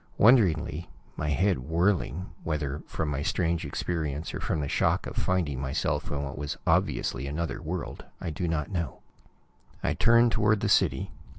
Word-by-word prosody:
Wonderingly, 90 -8 +4 0.3
my 75 - -2
head 90 +2 +2
whirling, 85 +4 0
whether 75 -2 -2
from 80 - -2
my 70 -1 -1
strange 85 +1 0
experience 75 0 -3
or - - -3
from - - -1
the 70 - -1
shock - - +1
of - - -6
finding 85 -8 0
myself 70 0 -1
in 70 0 -2
what 70 -1 -5
was 75 -1 -3
obviously 65 +3 +1
another 75 +1 -3
world, 85 +2 -4 0.2
I 85 - -3
do 85 +3 -2
not 80 +1 -1
know, 85 -7 -3 0.8
I - - +2
turned 115 0 +5
toward 110 -2 +3
the - - +1
city. - - +2
80 Hz, 165 wpm, -28 LUFS, 75-90 Hz, 0.8 s, turned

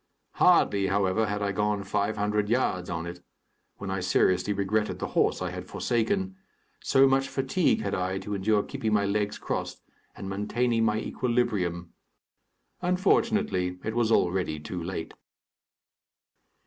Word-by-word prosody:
Hardly, 100 -1 +4
however, 100 +2 +1
had 105 0 -2
I 100 - 0
gone 105 0 0
five 100 +2 -1
hundred 105 0 0
yards 100 -7 0
on 85 -1 -3
it, 85 0 -8 0.5
when 100 -1 -5
I 95 - -1
seriously 90 +1 +2
regretted 105 +2 0
the - - -4
horse - - +1
I - - -3
had - - -7
forsaken, 190 - -1 0.4
so 135 0 +4
much 135 0 +2
fatigue 135 +6 +1
had 100 - -2
I 95 +1 -1
to 105 +2 -5
endure 100 +1 +1
keeping 110 -1 -3
my 100 -1 +3
legs 105 +1 -1
crossed - - -4 0.3
and 95 - -7
maintaining 115 +4 0
my 105 -1 +1
equilibrium. 105 -10 -1 0.9
Unfortunately, 180 - +1
it 110 +1 -3
was 120 -2 +1
already 90 -6 +1
too 85 +4 -6
late. 85 -2 -5
105 Hz, 145 wpm, -27 LUFS, 95-115 Hz, 0.9 s, Hardly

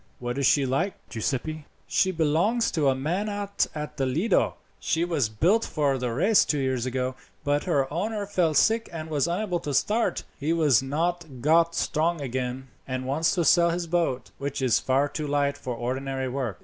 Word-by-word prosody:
"What 120 +2 -4
is 140 - +3
she 140 -2 +4
like, 140 +9 0
Giuseppi?" 145 +7 -3 0.2
"She 190 - +2
belongs 170 +9 +1
to 155 -4 +1
a 135 - +2
man 175 +10 -1
out 205 -1 -1
at 150 -1 -6
Lido. 135 - +1 0.2
She 165 +1 0
was 155 -10 0
built 180 - +2
for 140 -4 0
the 125 -1 -2
race 195 - +4
two 150 - 0
years 130 -2 -1
ago, 130 0 -1 0.3
but 145 0 0
her 145 -7 +2
owner 205 +4 -2
fell 180 -6 +1
sick 225 +9 +3
and 160 -1 -6
was 150 0 +1
unable 180 0 -1
to 145 -4 -3
start. 225 - +1 0.2
He 145 - -2
has 145 -8 +4
not 170 +6 -1 0.2
got 165 +3 +3
strong 165 +2 0
again, 130 -1 -4 0.2
and 130 -1 -3
wants 150 +7 +1
to 175 -3 +1
sell 170 0 +5
his 170 +1 -1
boat, 165 -7 -1
which 140 0 -3
is 130 -4 +3
far 135 +2 +1
too 150 +1 -4
light 140 0 +1
for 130 -4 -5
ordinary 130 +2 -3
work. 125 -6 -3
150 Hz, 190 wpm, -26 LUFS, 130-170 Hz, 0.3 s, sell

